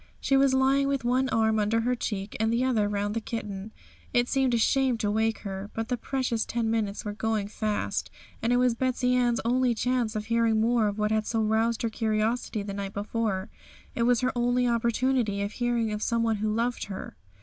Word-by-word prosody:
She 275 Hz, -, +1 dB
was 270 Hz, -1 st, +4 dB
lying 270 Hz, +1 st, +3 dB
with 275 Hz, -2 st, -1 dB
one 255 Hz, +2 st, +1 dB
arm 220 Hz, -2 st, +2 dB
under 215 Hz, +2 st, +1 dB
her 245 Hz, +2 st, +1 dB
cheek, 205 Hz, -4 st, -4 dB
and 220 Hz, +1 st, +2 dB
the 235 Hz, +2 st, +1 dB
other 225 Hz, -6 st, +1 dB
round 205 Hz, 0 st, -1 dB
the 230 Hz, -, -2 dB
kitten. 210 Hz, -2 st, -5 dB, 0.4 s
It 240 Hz, 0 st, +3 dB
seemed 265 Hz, -2 st, +2 dB
a -, -, +3 dB
shame 260 Hz, +1 st, +2 dB
to 205 Hz, -2 st, 0 dB
wake 220 Hz, +1 st, 0 dB
her; 195 Hz, 0 st, -6 dB
but 225 Hz, +1 st, -3 dB
the 250 Hz, -, +1 dB
precious 250 Hz, -2 st, -1 dB
ten 230 Hz, -2 st, -1 dB
minutes 215 Hz, -3 st, -2 dB
were 210 Hz, -, -3 dB
going 215 Hz, -1 st, -1 dB
fast, 215 Hz, -1 st, -2 dB, 0.3 s
and 230 Hz, -, +1 dB
it 245 Hz, -, +4 dB
was 250 Hz, -1 st, +3 dB
Betsey 250 Hz, +1 st, 0 dB
Ann's 245 Hz, -2 st, +2 dB
only 250 Hz, 0 st, +2 dB
chance 245 Hz, -1 st, 0 dB
of 210 Hz, 0 st, -3 dB
hearing 230 Hz, -1 st, +2 dB
more 230 Hz, -1 st, +3 dB
of 205 Hz, 0 st, -3 dB
what 210 Hz, 0 st, 0 dB
had 220 Hz, 0 st, 0 dB
so 225 Hz, -, 0 dB
roused 220 Hz, +2 st, +1 dB
her 230 Hz, -, +1 dB
curiosity 220 Hz, 0 st, -1 dB
the 200 Hz, 0 st, -5 dB
night 200 Hz, 0 st, -5 dB
before; 205 Hz, -1 st, -2 dB, 0.4 s
it -, -, -3 dB
was 240 Hz, 0 st, +3 dB
her 255 Hz, -, +1 dB
only 245 Hz, +1 st, +2 dB
opportunity 235 Hz, -2 st, +1 dB
of 200 Hz, -, -3 dB
hearing 240 Hz, -2 st, 0 dB
of 210 Hz, -, -4 dB
some 230 Hz, 0 st, +1 dB
one 225 Hz, -1 st, +1 dB
who 215 Hz, +1 st, -1 dB
loved 235 Hz, +3 st, -1 dB
her. 195 Hz, -2 st, -7 dB
230 Hz, 215 wpm, -27 LUFS, 215-245 Hz, 0.4 s, was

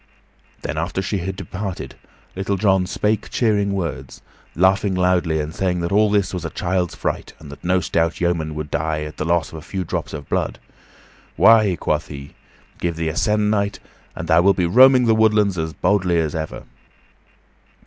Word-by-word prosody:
Then, 80 Hz, -, -3 dB
after 85 Hz, +3 st, -2 dB
she 95 Hz, +1 st, -2 dB
had 95 Hz, +2 st, -4 dB
departed, 95 Hz, +1 st, -6 dB, 0.4 s
Little 95 Hz, +1 st, -1 dB
John 95 Hz, -2 st, +2 dB
spake 105 Hz, +3 st, -1 dB
cheering 105 Hz, -4 st, +1 dB
words, 80 Hz, -9 st, -5 dB, 0.3 s
laughing 95 Hz, +2 st, +2 dB
loudly, 90 Hz, -3 st, +1 dB
and 75 Hz, +1 st, -4 dB
saying 90 Hz, -1 st, -1 dB
that 85 Hz, -, -2 dB
all 105 Hz, +1 st, +4 dB
this 100 Hz, -2 st, +1 dB
was 90 Hz, -2 st, -4 dB
a 80 Hz, -, -3 dB
child's 90 Hz, 0 st, -2 dB
fright, -, -, -4 dB
and 75 Hz, -2 st, -12 dB
that 70 Hz, -, -12 dB
no 90 Hz, +1 st, +2 dB
stout 85 Hz, 0 st, 0 dB
yeoman 85 Hz, -3 st, -1 dB
would 75 Hz, -1 st, -5 dB
die 75 Hz, 0 st, -1 dB
at 75 Hz, 0 st, -8 dB
the 75 Hz, -, -3 dB
loss 85 Hz, 0 st, 0 dB
of 80 Hz, -, -8 dB
a -, -, -12 dB
few 95 Hz, +4 st, -4 dB
drops -, -, -4 dB
of 75 Hz, -2 st, -7 dB
blood. -, -, -1 dB, 0.8 s
"Why," 110 Hz, -5 st, +5 dB
quoth -, -, -1 dB
he, 70 Hz, -1 st, -9 dB, 0.5 s
"give 85 Hz, -1 st, -2 dB
thee 80 Hz, -1 st, -2 dB
a 80 Hz, -, -5 dB
se'ennight 105 Hz, 0 st, +1 dB, 0.4 s
and -, -, -6 dB
thou 80 Hz, 0 st, +5 dB
wilt 100 Hz, +1 st, +3 dB
be 90 Hz, -, +2 dB
roaming 125 Hz, +6 st, +6 dB
the 115 Hz, -, +4 dB
woodlands 105 Hz, -3 st, +3 dB
as 80 Hz, 0 st, -2 dB
boldly 90 Hz, 0 st, +1 dB
as 80 Hz, -3 st, 0 dB
ever." 80 Hz, -7 st, -5 dB
90 Hz, 185 wpm, -21 LUFS, 80-100 Hz, 0.8 s, roaming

